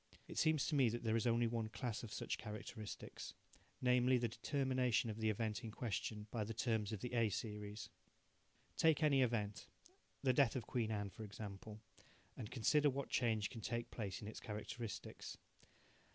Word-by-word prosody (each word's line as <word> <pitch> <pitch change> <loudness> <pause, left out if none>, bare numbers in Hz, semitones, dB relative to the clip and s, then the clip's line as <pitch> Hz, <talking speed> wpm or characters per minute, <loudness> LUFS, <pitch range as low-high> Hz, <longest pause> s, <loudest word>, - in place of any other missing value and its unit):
It - - -3
seems 155 -3 +4
to - - -1
me 135 -5 +5
that 120 +2 -3
there 110 -1 +2
is 115 +2 +2
only 120 0 +4
one 115 -1 0
class 115 0 -3
of 115 - -7
such - - -2
characteristics 110 0 -6 0.5
namely, 125 0 +5
the 120 -1 +1
determination 130 -3 +1
of 105 - -6
the 110 0 +2
event 110 +2 -1
in 115 - -4
question 110 -1 -2
by 115 -3 0
the 110 +1 -4
terms 110 -2 +1
of 105 -3 -3
the 125 - -4
A 115 -2 +4
series. 105 0 -4 0.9
Take 160 -1 +5
any 140 -3 +5
event 105 -6 0 0.6
the 130 -2 +5
death 135 -2 +5
of 120 -4 -2
Queen 115 -3 0
Anne, 105 -2 -1
for 110 - -8
example 105 +1 -7 0.5
and 105 - -5
consider 145 +5 +4
what 140 0 -2
change 110 -4 +2
can 115 - -6
take 120 +1 -2
place 100 -3 -4
in - - -5
its 110 - -6
characteristics. 110 0 -5
115 Hz, 180 wpm, -40 LUFS, 105-125 Hz, 0.9 s, me